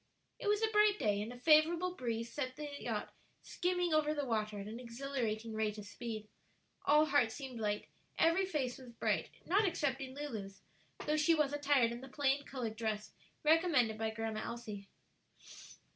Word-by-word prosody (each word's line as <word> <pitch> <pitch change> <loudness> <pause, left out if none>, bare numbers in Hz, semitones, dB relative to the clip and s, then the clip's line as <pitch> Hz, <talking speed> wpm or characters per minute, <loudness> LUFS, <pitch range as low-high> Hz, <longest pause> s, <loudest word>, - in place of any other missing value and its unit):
It - - -4
was 420 +1 +2
a - - +5
bright 420 -1 +5
day, 205 - +1
and 220 +3 -4
a 245 - -9
favorable 325 +6 +4
breeze 230 -5 -3
sent 255 -3 -3
the 300 - -5
yacht - - -3 0.3
skimming 360 -2 0
over 305 0 +3
the 290 -1 -1
water 215 -3 -1
at 200 - -5
an 225 +3 -6
exhilarating 235 -3 -3
rate 215 -1 -1
of 210 - -7
speed. 215 0 -6 0.6
All 300 +1 +6
hearts 270 -7 +2
seemed 265 -4 -6
light, 210 -1 -1 0.3
every 335 +4 +4
face 270 -8 -2
was 255 -2 -11
bright, - - 0 0.2
not 400 +5 +3
excepting 270 - -1
Lulu's, 215 -10 -6 0.4
though 305 +1 +2
she 320 +2 +4
was 295 -2 +1
attired 285 -5 +3
in 235 +1 -6
the 265 - -9
plain 280 +1 +1
colored 235 -5 -4
dress 215 -2 -2 0.3
recommended 300 -9 +4
by 220 0 0
Grandma 220 0 -3
Elsie. 215 -4 -6
260 Hz, 175 wpm, -35 LUFS, 220-305 Hz, 0.6 s, All